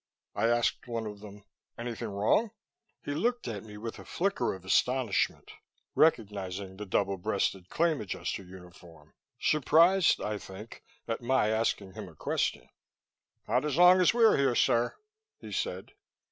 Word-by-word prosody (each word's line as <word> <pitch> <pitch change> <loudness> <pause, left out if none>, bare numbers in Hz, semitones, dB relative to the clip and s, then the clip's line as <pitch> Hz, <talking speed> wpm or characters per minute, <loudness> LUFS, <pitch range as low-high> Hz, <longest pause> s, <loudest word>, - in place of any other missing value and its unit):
I 110 +3 +1
asked 120 +1 +1
one 115 -2 -3
of 105 -1 -7
them, 105 -1 -12 0.3
"Anything 115 -1 -5
wrong?" 105 - +1 0.6
He 145 - -2
looked 240 - -1
at 110 -4 -5
me 105 -1 -11
with 115 +2 -7
a - - -9
flicker 195 - -1
of 95 -1 -13
astonishment, 125 +2 +1 0.4
recognizing 100 - 0
the 105 0 -7
double 100 +1 0
breasted 95 -2 -2
Claim 165 -3 +1
Adjuster 100 0 -4
uniform, 90 -4 -15 0.3
surprised, 165 +5 +4
I 105 -1 -3
think, 100 +4 -11 0.2
at 115 +1 -3
my 120 -3 +2
asking 110 -3 -1
him 100 -2 -8
a 80 - -17
question. - - -2 0.8
"Not 125 +5 +1
as 150 -1 -1
long 180 +1 +7
as 180 - +5
we're 230 -1 +4
here, 135 -3 +2
sir," 120 +1 +2 0.4
he - - -11
said. - - -3
110 Hz, 150 wpm, -29 LUFS, 100-140 Hz, 0.8 s, long